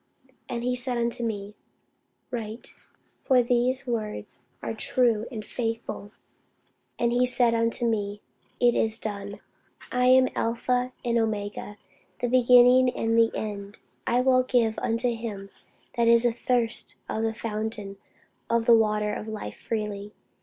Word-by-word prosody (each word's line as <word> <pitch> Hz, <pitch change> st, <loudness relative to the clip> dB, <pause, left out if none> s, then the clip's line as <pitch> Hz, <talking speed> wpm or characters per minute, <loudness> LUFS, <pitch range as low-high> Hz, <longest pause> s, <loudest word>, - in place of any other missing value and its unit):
And 235 Hz, -1 st, -3 dB
he 250 Hz, 0 st, 0 dB
said 250 Hz, 0 st, -2 dB
unto 235 Hz, 0 st, -1 dB
me, 205 Hz, -2 st, -4 dB, 0.8 s
Write: 225 Hz, -1 st, -6 dB, 0.5 s
for 255 Hz, -2 st, +4 dB
these 245 Hz, +2 st, +1 dB
words 220 Hz, -4 st, -4 dB, 0.2 s
are -, -, -2 dB
true 235 Hz, -4 st, +1 dB
and 215 Hz, -3 st, -6 dB
faithful. 225 Hz, -3 st, -4 dB, 0.9 s
And 235 Hz, 0 st, +1 dB
he 250 Hz, +1 st, +3 dB
said 245 Hz, -2 st, +3 dB
unto 230 Hz, +1 st, +1 dB
me, 205 Hz, -2 st, -1 dB, 0.4 s
It 240 Hz, -1 st, +4 dB
is 220 Hz, 0 st, +1 dB
done. 200 Hz, -2 st, -6 dB, 0.5 s
I 250 Hz, 0 st, +1 dB
am 255 Hz, 0 st, +6 dB
Alpha 245 Hz, +2 st, 0 dB
and 235 Hz, -1 st, +2 dB
Omega, 210 Hz, -1 st, -3 dB, 0.4 s
the 245 Hz, -, -2 dB
beginning 250 Hz, +1 st, +6 dB
and 225 Hz, 0 st, 0 dB
the 230 Hz, 0 st, +5 dB
end. 205 Hz, -1 st, -5 dB, 0.3 s
I 245 Hz, +1 st, +3 dB
will 255 Hz, 0 st, +4 dB
give 240 Hz, -3 st, +1 dB
unto 230 Hz, +1 st, 0 dB
him 210 Hz, -4 st, -6 dB, 0.5 s
that 235 Hz, -1 st, +3 dB
is 235 Hz, +1 st, +5 dB
athirst 240 Hz, 0 st, 0 dB
of 220 Hz, -, -2 dB
the 225 Hz, 0 st, -1 dB
fountain 215 Hz, -2 st, -4 dB, 0.5 s
of 230 Hz, -1 st, +1 dB
the 235 Hz, -, +7 dB
water 210 Hz, -1 st, +1 dB
of 210 Hz, -, -5 dB
life 220 Hz, -1 st, -6 dB
freely. 210 Hz, -2 st, -4 dB
230 Hz, 140 wpm, -26 LUFS, 215-245 Hz, 0.9 s, the